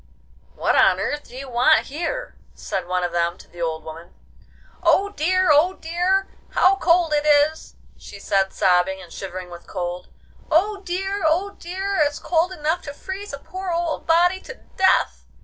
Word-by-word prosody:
'What - - +1
on - - +5
earth 295 0 -3
do - - -13
you 275 +1 -7
want 250 +5 +3
here?' 320 +5 -4 0.2
said 185 -2 -4
one 180 0 -1
of 175 - -1
them 170 0 0
to - - -16
the 175 - -11
old 160 -1 -2
woman. 160 +2 -11 0.7
'Oh 400 +1 +3
dear! 370 -1 +1
oh 310 +6 +4
dear! 360 +4 0 0.3
How 385 +2 +4
cold 335 -2 +3
it 295 0 +2
is!' 300 +1 +2 0.2
she 200 - -11
said, 195 -1 +1
sobbing, 190 -1 +2
and 175 -3 -12
shivering 185 -2 -7
with 175 0 -11
cold. 175 -1 -5 0.4
'Oh 400 +6 +2
dear! 385 +2 -3
oh 360 +6 +1
dear! 385 +2 -4
it's 290 -1 +1
cold 345 +1 0
enough 320 0 -1
to 285 -1 -7
freeze 385 +5 -7
a 280 - -5
poor 370 +6 -7
old 340 -1 -2
body 350 +3 +4
to 480 - -10 0.2
death! 380 0 +2
310 Hz, 175 wpm, -22 LUFS, -, 0.7 s, on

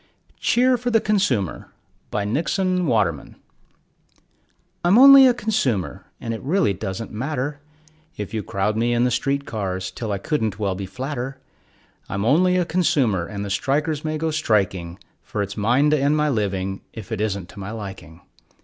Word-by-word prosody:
CHEER 250 +1 +3
FOR 245 +1 -1
THE 225 -2 +4
CONSUMER 190 - 0 0.4
BY 105 -1 -2
NIXON 180 - 0
WATERMAN 100 - 0 1.5
I'm 175 +5 +5
only 275 +1 +10
a 250 - +4
consumer, 135 - -1
and 115 - -4
it 115 - -6
really 155 - +1
doesn't 95 +3 -5
matter 145 +4 -3 0.6
If 105 0 -6
you 110 - -1
crowd 100 +2 -1
me 120 +2 +1
in 120 0 +2
the 125 - +2
street 140 +1 0
cars 95 -4 -3
till 110 +2 -5
I 100 - 0
couldn't 110 -2 -1
well 100 -3 -1
be 95 0 -5
flatter; 130 +5 -5 0.7
I'm 100 +1 -2
only 180 +8 +4
a 180 - +1
consumer, 140 - +1
and 100 0 -5
the 100 - -5
strikers 145 +7 0
may 155 0 -2
go 160 +1 -1
striking, 95 - 0 0.2
For 105 - -3
it's 100 0 -6
mine 125 +8 +2
to 155 - +3
end 145 +2 +2
my 150 0 +2
living 95 -5 -2
if 110 0 -9
it 110 -2 -2
isn't 100 -4 -2
to - - -12
my 95 0 -6
liking. 95 -6 -8
115 Hz, 170 wpm, -22 LUFS, 100-155 Hz, 1.5 s, only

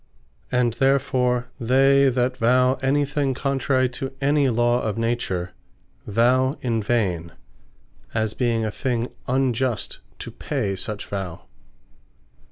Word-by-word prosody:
And 125 -2 +2
therefore 125 -1 +1
they 135 +3 +4
that 125 0 0
Vow 125 +2 +3
any 140 +2 +2
thing 140 -2 -1
contrary 135 -1 +1
to 130 +2 -5
any 140 0 +2
law 120 +1 +2
of 110 -1 -2
Nature, 115 -6 -1 0.6
Vow 130 +6 +2
in 115 -3 0
vain; 95 -7 -1 0.8
as 110 -1 -1
being 115 -3 0
a 110 - -2
thing 120 +1 -2 0.2
unjust 130 -3 0 0.2
to - - -8
pay 115 -10 -2
such 105 +2 -5
Vow. 95 -4 -5
125 Hz, 120 wpm, -23 LUFS, 115-135 Hz, 0.8 s, they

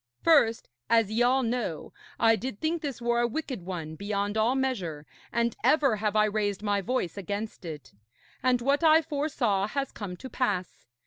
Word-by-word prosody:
First, 260 -9 +4 0.2
as 225 -3 +3
ye 225 +2 +1
all 255 +2 +3
know, 230 -8 -3 0.3
I 225 0 +5
did 240 -2 -5
think 320 +1 -1
this 280 -6 -4
war 235 0 +2
a 240 - +2
wicked 265 - -4
one 170 -3 -5
beyond 200 +3 -2
all 220 +4 +2
measure, 190 - -2 0.3
and 235 -1 0
ever 270 -3 +4
have 210 0 -1
I 215 0 +5
raised 205 -1 -1
my 205 -1 +1
voice 210 -4 -2
against 200 +1 -5
it. 155 -4 -8 0.5
And 250 -1 +2
what 280 +5 +1
I 320 0 +6
foresaw 280 -10 0
has 275 +3 -3
come 185 -4 -7
to 260 - -8
pass. 220 -8 -2
225 Hz, 180 wpm, -28 LUFS, 200-260 Hz, 0.5 s, I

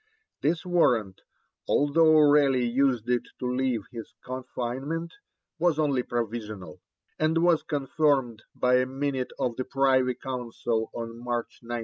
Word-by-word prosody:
This 160 +5 0
warrant, 120 - +1 0.5
although 155 +2 +4
Raleigh 145 -4 +4
used 125 -1 +1
it 125 0 +2 0.2
to - - -5
leave 125 -3 0
his 115 -2 -9
confinement, 130 +6 -4 0.5
was 170 -2 +2
only 145 -5 +1
provisional; 110 -5 -5 0.4
and 160 +2 +2
was 170 -2 +4
confirmed 135 -5 0
by 125 0 +3
a 130 0 +1
minute 135 -1 -2
of 125 -4 -2
the 130 - -1
Privy 130 -1 +2
Council 120 -3 -3
on 115 0 -6
March 120 -1 -3
19. 120 0 -4
130 Hz, 130 wpm, -27 LUFS, 120-145 Hz, 0.5 s, although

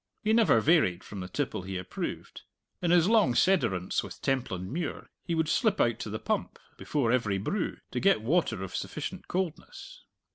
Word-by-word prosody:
He 215 +1 +2
never 225 - +5
varied 125 - +3
from 100 - -8
the 90 - -5
tipple 135 0 -2
he 95 0 -5
approved. 90 0 -6 0.4
In 175 - 0
his 175 0 +5
long 215 - +4
sederunts 95 - +2
with - - -9
Templandmuir 130 - -2
he 170 - -2
would 160 -1 +1
slip 210 - +2
out 120 -1 +2
to 125 - -5
the 110 - -3
pump, - - -2 0.2
before 135 -6 0
every 110 -6 +1
brew, 175 - -2
to - - -1
get 195 - +3
water 120 - +1
of 95 - -6
sufficient - - -5
coldness. 190 - -5
135 Hz, 175 wpm, -29 LUFS, -, 0.4 s, never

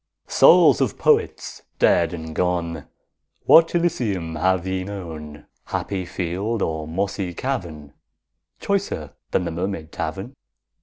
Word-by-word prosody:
Souls - - +6
of - - 0
Poets - - +1 0.2
dead 85 -1 +3
and 80 -2 -7
gone, 85 -4 -1 0.6
What 165 +1 +6
Elysium 105 - -1
have 95 +2 +1
ye 95 0 -2
known, 80 -6 -8 0.2
Happy 95 -3 -3
field 95 +5 -2
or 80 -1 -3
mossy 95 +1 -3
cavern, 85 - -4 0.7
Choicer 195 - -2 0.2
than 90 - 0
the 85 - -3
Mermaid 85 -2 -4
Tavern? 90 +9 -5
90 Hz, 115 wpm, -22 LUFS, 80-100 Hz, 0.7 s, Souls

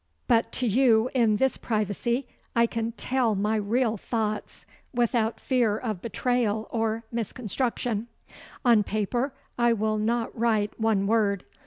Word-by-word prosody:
But 230 -2 +3
to 255 - -1
you 235 +1 +3
in 230 -5 +3
this 265 +4 +1
privacy 230 +4 -1 0.3
I 235 0 +5
can 230 0 -3
tell 245 -2 0
my 210 +3 0
real 220 +2 +1
thoughts 215 0 -3 0.3
without 235 -2 +1
fear 240 -5 +1
of 215 -6 -4
betrayal 230 -1 0
or 225 0 -1
misconstruction. 235 0 -2 0.6
On 235 -3 +6
paper 215 +6 -1 0.3
I 240 0 +4
will 215 -1 0
not 230 +2 -1
write 220 -3 0
one 220 -3 +2
word. 205 -3 +1
225 Hz, 135 wpm, -26 LUFS, 215-240 Hz, 0.6 s, On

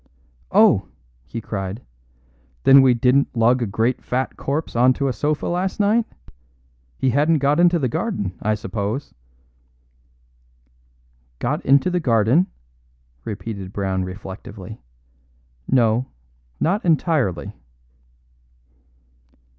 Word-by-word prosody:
"Oh!" - - +4 0.4
he 115 - -5
cried; 100 +1 -5 0.8
"then 135 0 +8
we 130 -2 +4
didn't 125 +2 +2
lug 120 +2 +3
a 115 - 0
great 115 +5 -1
fat 130 +1 -2
corpse 145 +1 -3
on 125 +2 +5
to 140 +1 -2
a 130 - 0
sofa 150 +3 -1
last 185 +4 -2
night? 215 +3 +2 0.9
He 130 - +1
hadn't 150 +5 +3
got 145 +2 +1
into 175 0 +4
the 135 -5 0
garden, 160 - -3
I 110 +1 +1
suppose?" 105 +6 -4 2.2
"Got - - -2
into 140 +7 +3
the 180 - +1
garden?" 125 - +3 0.8
repeated 100 -2 -6
Brown 95 -2 -1
reflectively. 95 +2 -9 0.9
"No, 120 -1 +2 0.5
not 200 +7 0
entirely." 155 - 0
125 Hz, 105 wpm, -21 LUFS, 105-150 Hz, 2.2 s, then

